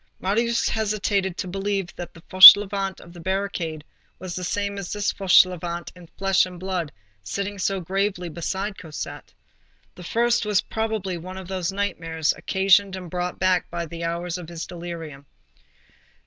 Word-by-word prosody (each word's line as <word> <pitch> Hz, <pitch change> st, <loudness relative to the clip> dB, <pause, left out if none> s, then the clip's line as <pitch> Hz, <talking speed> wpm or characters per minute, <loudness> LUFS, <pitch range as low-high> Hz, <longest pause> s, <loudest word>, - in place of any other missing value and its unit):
Marius 230 Hz, +5 st, 0 dB
hesitated 200 Hz, -4 st, -1 dB
to -, -, -4 dB
believe 195 Hz, 0 st, -3 dB
that 175 Hz, -, -7 dB
the 165 Hz, -, -14 dB
Fauchelevent 195 Hz, +1 st, +8 dB
of 170 Hz, -, -14 dB
the 175 Hz, -, -12 dB
barricade 180 Hz, -4 st, -3 dB, 0.3 s
was 185 Hz, -2 st, -7 dB
the 185 Hz, -, -5 dB
same 200 Hz, +2 st, -2 dB
as 195 Hz, -, -6 dB
this 205 Hz, -1 st, -1 dB
Fauchelevent 180 Hz, -3 st, +2 dB
in 175 Hz, -1 st, -14 dB
flesh 195 Hz, 0 st, +3 dB
and 180 Hz, -1 st, -11 dB
blood, 180 Hz, -4 st, -3 dB, 0.3 s
sitting 200 Hz, -, -4 dB
so 195 Hz, +1 st, 0 dB
gravely 190 Hz, 0 st, -2 dB
beside 190 Hz, +5 st, -4 dB
Cosette. 155 Hz, -3 st, -8 dB, 0.6 s
The 180 Hz, -, -12 dB
first 235 Hz, +5 st, +1 dB
was, 210 Hz, -2 st, +2 dB
probably, 215 Hz, -5 st, -3 dB
one 185 Hz, +3 st, -9 dB
of 190 Hz, -2 st, -8 dB
those 185 Hz, -1 st, -2 dB
nightmares 165 Hz, -6 st, -1 dB
occasioned 195 Hz, 0 st, +2 dB
and 180 Hz, -3 st, -9 dB
brought 180 Hz, 0 st, -3 dB
back 185 Hz, -1 st, +1 dB
by 170 Hz, 0 st, -4 dB
his 165 Hz, +1 st, -9 dB
hours 170 Hz, +1 st, -3 dB
of 175 Hz, -, -9 dB
delirium. 165 Hz, -4 st, -8 dB
185 Hz, 155 wpm, -23 LUFS, 170-200 Hz, 0.6 s, Fauchelevent